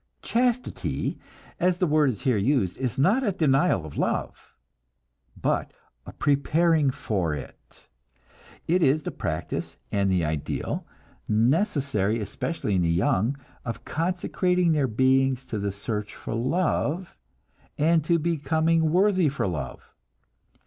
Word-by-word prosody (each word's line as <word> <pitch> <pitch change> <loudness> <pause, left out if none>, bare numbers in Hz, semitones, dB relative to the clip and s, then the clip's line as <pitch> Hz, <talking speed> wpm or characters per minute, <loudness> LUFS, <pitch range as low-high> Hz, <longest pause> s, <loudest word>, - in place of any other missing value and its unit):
Chastity, 245 +1 -1 0.4
as 180 0 +2
the 180 - +2
word 150 -3 +3
is 110 -6 -4
here 130 -3 +2
used, 105 -3 +1
is 130 -4 -2
not 195 - +3
a 210 - +2
denial 145 - +2
of 75 - -7
love, - - -3 0.8
but - - -1 0.3
a - - -7
preparing 155 +1 +2
for 95 -11 -1
it; 70 - -12 0.8
it 180 +3 +2
is 150 0 +3
the - - -3
practice 80 0 -4
and 100 -1 +1
the 90 -3 +2
ideal, 75 -1 -3 0.4
necessary 120 - +1
especially 105 +2 -3
in 90 - +2
the 85 - +1
young, 100 +9 +1 0.3
of 115 - -6
consecrating 180 +1 0
their 145 -4 +2
beings 130 +2 +2
to 115 -4 -4
the 100 0 -1
search 105 +1 -4
for - - -6
love, 160 +6 -1 0.6
and 160 +1 +3
to 170 +2 +2
becoming 160 0 +1
worthy 185 -1 +3
for 140 - -2
love. 75 -9 -5
140 Hz, 130 wpm, -26 LUFS, 105-170 Hz, 0.8 s, word